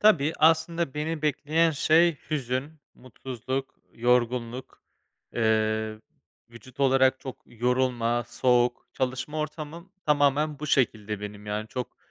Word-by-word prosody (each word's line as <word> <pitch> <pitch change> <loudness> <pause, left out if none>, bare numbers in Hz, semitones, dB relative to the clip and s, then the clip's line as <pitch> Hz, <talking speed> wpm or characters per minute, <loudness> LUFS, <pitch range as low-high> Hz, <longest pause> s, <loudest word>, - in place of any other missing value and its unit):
Tabii. 160 -8 +4
Aslında 165 -1 +2
beni 155 +1 -3
bekleyen 155 +3 +2
şey 160 +2 +3
hüzün, 135 0 -2 0.2
mutsuzluk, 130 +1 -6 0.2
yorgunluk. 120 +1 0 0.5
Eee, 110 -1 +1 0.5
vücut 125 +3 -13
olarak 130 -1 +4
çok 130 - -8
yorulma, 120 0 0
soğuk 120 -1 +2
Çalışma 130 +4 -2
ortamım 155 +4 -6
tamamen 145 0 +2
bu 150 - -5
şekilde 110 -7 +1
benim. 105 0 -8
Yani, 105 +1 -3
çok 125 +1 -5
130 Hz, 110 wpm, -27 LUFS, 120-150 Hz, 0.5 s, Tabii